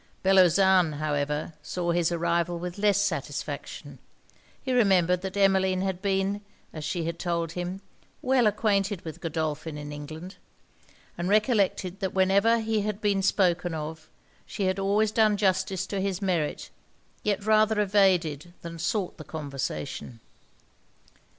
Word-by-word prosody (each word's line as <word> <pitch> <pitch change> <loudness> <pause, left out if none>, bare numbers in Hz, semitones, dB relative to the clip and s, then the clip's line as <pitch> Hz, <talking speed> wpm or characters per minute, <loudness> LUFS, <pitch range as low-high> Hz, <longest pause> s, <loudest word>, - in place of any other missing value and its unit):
Bellozane, 190 -2 +5
however, 150 +1 -2
saw 175 +3 -2
his 170 0 +1
arrival 170 0 0
with 180 +2 -6
less 205 -1 +3
satisfaction. 205 - -4 0.6
He 260 - -3
remembered 180 -6 +3
that 190 +1 -5
Emmeline 190 -1 +3
had 190 -1 -2
been, 195 0 0 0.3
as 155 - -6
she 165 +2 -2
had 170 0 -4
told 170 -1 -1
him, 180 +2 -5 0.4
well 255 -3 +3
acquainted 205 -3 0
with 160 -2 -7
Godolphin 160 -1 -3
in 145 0 -7
England; 155 +6 -8 0.8
and 175 +2 -1
recollected 205 -3 +1
that 190 -3 -3
whenever 200 +5 +3
he 220 -1 0
had 210 0 -3
been 205 -2 +1
spoken 175 -3 +1
of, 155 +1 -6 0.4
she 200 - -4
had 185 0 0
always 205 +2 +2
done 215 -2 +3
justice 190 -2 +1
to 200 -2 -3
his 190 -2 -1
merit, 175 -6 -2 0.5
yet 205 -1 -1
rather 215 0 +4
evaded 180 -6 +2
than 170 0 -7
sought 200 +1 -2
the - - -7
conversation. 135 - -5
185 Hz, 135 wpm, -27 LUFS, 165-200 Hz, 0.8 s, Bellozane